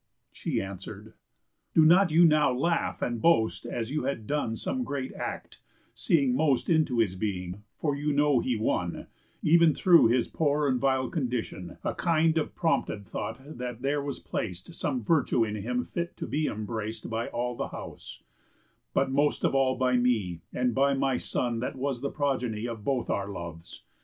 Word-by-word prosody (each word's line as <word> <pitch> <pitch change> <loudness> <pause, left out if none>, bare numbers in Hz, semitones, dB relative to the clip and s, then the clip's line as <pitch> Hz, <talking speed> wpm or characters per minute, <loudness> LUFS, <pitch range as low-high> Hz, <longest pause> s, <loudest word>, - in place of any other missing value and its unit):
She - - -2
answer'd: 95 -1 -7 0.6
"Do 160 - +7
not 175 +2 +6
you 170 +3 +6
now 150 -3 +4
laugh 165 +7 0
and 120 -2 -2
boast 115 -10 +2
As 115 +1 -3
you 150 -3 -1
had 135 -5 -2
done 130 -4 -1
some 255 - -2
great 140 - -4
act, - - -6 0.3
seeing 140 -6 +2
most 145 +1 +2
Into 155 -6 +2
his 110 -5 +2
being; 95 -1 -4 0.2
for 145 -3 0
you 150 +1 -1
know 145 -2 +3
he 125 0 0
won— 90 -5 -1 0.4
Ev'n 165 -1 +6
through 175 -8 +6
his 120 +1 +2
poor 150 -1 +1
and 130 -2 +1
vile 130 -1 +1
condition— 120 - -3
A - - -1
kind 165 -1 +2
of 155 - -4
prompted 110 - 0
thought 110 +6 -5 0.2
that 125 -1 -5
there 145 +1 +1
was 140 0 -4
plac'd 90 - -5
Some 145 -8 -2
virtue 130 -3 +2
in 105 -1 -3
him 125 +4 -2
fit 170 0 -5
to - - -4
be 150 +1 -1
embrac'd 110 +1 -4
By 115 +1 -2
all 120 0 -2
the - - -3
house, - - -9 0.7
but - - +2
most 145 +2 +1
of - - +2
all 135 -1 +3
by 130 -1 +2
me, 110 -9 0
And 125 -1 0
by 140 +3 +3
my 135 -1 +1
son 120 -2 -1
that 125 - -3
was 130 -2 -2
the 140 - -1
progeny 125 -6 -1
Of 115 -3 -6
both 130 -1 -1
our 100 0 -1
loves. 85 -3 -8
130 Hz, 180 wpm, -28 LUFS, 115-150 Hz, 0.7 s, Do